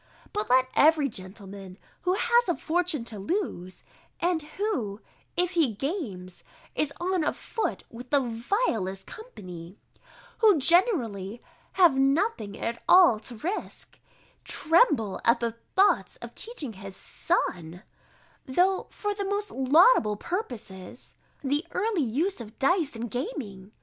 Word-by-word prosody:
But 420 0 -2
let 255 +1 +5
every 305 -1 +5
gentleman, 195 -1 -9 0.2
who 365 +1 +1
has 475 0 +3
a 345 - +2
fortune 330 -5 0
to 225 -3 -7
lose, 195 - -3 0.4
and 345 -2 +1
who, 295 - -3 0.4
if 355 0 +2
he 315 - +1
games, 205 - -4 0.3
is 300 -2 0
on 360 -1 0
a - - +2
foot 450 - -3
with 245 +2 -10
the 285 - +4
vilest 230 - -1
company, 185 - -10 0.6
who 430 -6 +6
generally 245 - +2 0.3
have 350 -7 +5
nothing 270 - +1
at 235 +1 -4
all 355 - +7
to 240 +2 -8
risque, 365 - -5 0.4
tremble 305 - +2
at 235 +2 +4
the 235 -1 -1 0.2
thoughts 390 +2 +3
of - - -10
teaching 320 - -5
his 195 -1 -9
son, 175 +2 -1 0.6
though 365 +8 +2
for 415 0 -3
the 405 0 -3
most 405 +1 -2
laudable 270 - +5
purposes, 230 - -6 0.3
the 290 +3 0
early 410 -2 0
use 285 - -1
of 220 0 -11
dice 310 -1 +2
and 230 0 -5
gaming. 220 - -5
275 Hz, 130 wpm, -27 LUFS, -, 0.6 s, all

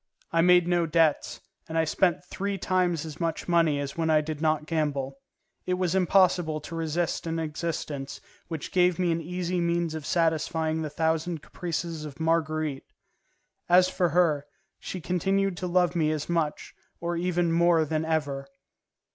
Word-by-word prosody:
I 165 - +3
made 180 0 +5
no 175 -1 +2
debts, 160 -1 +1 0.3
and 160 - -2
I 160 - +4
spent 175 +2 +1
three 200 +2 -3
times 180 -4 0
as 155 -2 -8
much 165 -2 -2
money 165 -4 +3
as 140 -1 -4
when 165 -1 0
I 155 -1 +5
did 155 0 -5
not 155 -1 +1
gamble. 140 -4 -2 0.5
It 180 - +1
was 180 -2 0
impossible 180 -4 +3
to 165 +3 -8
resist 165 +1 -2
an 165 0 -2
existence 150 -3 -4 0.3
which 160 -4 -5
gave 180 -1 +3
me 180 -2 +1
an 165 0 -1
easy 180 +2 -2
means 170 -1 0
of 155 -2 -6
satisfying 160 -1 0
the 155 - -3
thousand 160 +1 -1
caprices 170 -2 -4
of 150 -1 -9
Marguerite. 155 -3 -1 0.8
As 180 +1 +6
for 180 -2 +1
her, 155 -4 +2 0.3
she 185 - -6
continued 195 +3 0
to 180 - -3
love 180 0 +2
me 160 -3 +2
as 155 -1 -2
much, 165 -3 -2 0.3
or 170 0 -2
even 175 0 0
more 170 -1 +4
than 155 +1 -1
ever. 145 -4 -2
165 Hz, 165 wpm, -27 LUFS, 155-175 Hz, 0.8 s, As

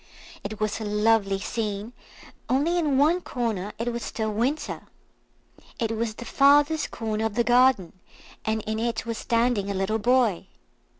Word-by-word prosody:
It 210 +1 -6
was 215 +1 -1
a - - -3
lovely 210 -1 +2
scene, 210 +2 -4 0.6
only 310 +7 +2
in 295 -5 +1
one 320 +6 +3
corner 220 - -3
it 235 +1 -2
was 235 - -4
still 220 -1 -3
winter. 260 +8 -2 0.9
It 225 -2 -1
was 220 -1 -2
the 240 - -8
farthest 290 +5 +4
corner 220 -1 -3
of 220 -2 -2
the 235 - +2
garden, 245 -6 +3 0.5
and 220 0 -1
in 220 0 -3
it 235 0 -2
was 230 -1 -4
standing 230 -4 +1
a 200 - -2
little 195 +4 0
boy. 240 -5 +2
225 Hz, 160 wpm, -25 LUFS, 215-250 Hz, 0.9 s, farthest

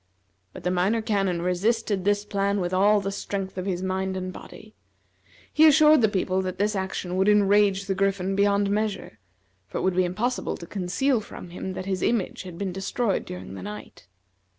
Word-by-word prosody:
But - - -11
the 180 - 0
Minor 185 +5 +1
Canon 195 -6 0
resisted 200 +2 0
this 205 0 +1
plan 200 0 0
with 180 0 -2
all 205 +2 +4
the 195 0 -3
strength 195 -1 -4
of 185 - -4
his 185 -1 -2
mind 190 0 -2
and 185 0 -4
body. - - -12 0.8
He 315 +1 +7
assured 305 -1 +6
the 220 - +4
people 190 -2 0
that 185 -1 -4
this 210 +2 0
action 190 -1 -3
would 190 +2 +3
enrage 205 -1 +4
the 195 - -1
Griffin 195 0 0
beyond 200 0 +2
measure, 205 - -2 0.5
for - - -5
it - - -2
would 185 -1 +1
be 185 - +3
impossible 225 +8 -2
to 170 - -9
conceal 205 +9 0
from 180 -4 -10
him 185 +1 -5
that 185 - -6
his 190 -1 -2
image 225 -6 0
had 180 -3 -9
been 195 0 -3
destroyed 195 +3 -1
during 90 +1 -8
the 95 - -8
night. 105 -2 -9
195 Hz, 195 wpm, -25 LUFS, 185-205 Hz, 0.8 s, He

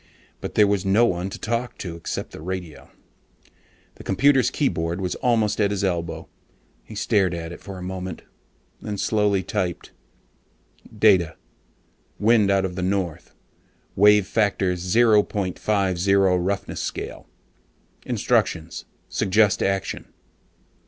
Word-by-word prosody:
But - - -7
there 105 - +6
was 100 -2 +1
no 100 +5 +4
one 90 -3 -1
to - - -7
talk 115 +2 -3
to 85 -3 -6
except 85 - -5
the - - -10
radio. 90 -2 -6 1.1
The - - -11
computer's 130 +5 +3
keyboard 85 - -1
was 90 -2 -2
almost 110 -4 +1
at 100 - +3
his 100 -1 -2
elbow. 85 -3 -2 0.6
He - - -11
stared 95 -4 +1
at 80 0 -6
it 85 - -10
for 95 -2 -8
a 90 - -8
moment, 95 -2 -6 0.6
then 105 -1 -4
slowly 105 -1 +1
typed: 90 -5 -3 1.0
DATA: 95 -7 +3 0.8
WIND 110 -1 +3
OUT 95 -1 +2
OF 90 - -4
THE 90 - -3
NORTH, 90 -3 -2 0.6
WAVE 105 0 +5
FACTOR 100 -3 +1
0.50 95 -2 +2
ROUGHNESS 95 +3 -2
SCALE. - - -6 0.8
INSTRUCTIONS: 85 -1 0 0.2
SUGGEST 100 +1 +2
ACTION. 95 0 -1
95 Hz, 125 wpm, -23 LUFS, 90-105 Hz, 1.1 s, there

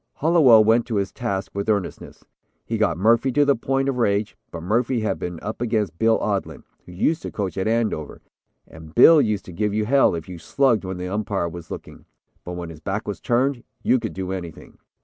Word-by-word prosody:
Hallowell 145 -9 +5
went 115 +2 +3
to 115 - -3
his 100 -1 -1
task 100 -6 -3
with 100 +2 -3
earnestness. 100 -4 -3 0.4
He - - -3
got - - +1
Murphy 115 +7 +3
to 145 +2 +4
the 140 -1 +3
point 135 +3 -1
of 135 -2 -1
rage, 100 -2 0
but 85 -1 -8
Murphy 115 +5 0
had 110 - -2
been 90 -1 -5
up 110 +2 -5
against 105 -8 -1
Bill 115 0 +4
Odlin, 100 -2 -3 0.2
who - - -11
used 155 - 0
to - - -5
coach 100 -3 -3
at 95 +2 -2
Andover, 110 -9 -1 0.5
and 80 0 -13
Bill 155 +5 +8
used 105 -5 -1
to 90 - -10
give 105 +3 -1
you 110 0 0
hell 135 -4 +3
if 80 -2 -6
you 90 -2 -8
slugged 120 +2 +1
when 95 0 -4
the 90 0 -5
umpire 100 -3 -2
was 85 -1 -10
looking. - - -9 0.4
But 90 - -6
when 85 -1 -6
his 80 - -12
back 95 +6 -4
was 105 - -4
turned 125 +1 0 0.2
you 130 - +3
could - - -5
do 95 0 -4
anything. 85 -4 -8
105 Hz, 215 wpm, -22 LUFS, 90-120 Hz, 0.5 s, Bill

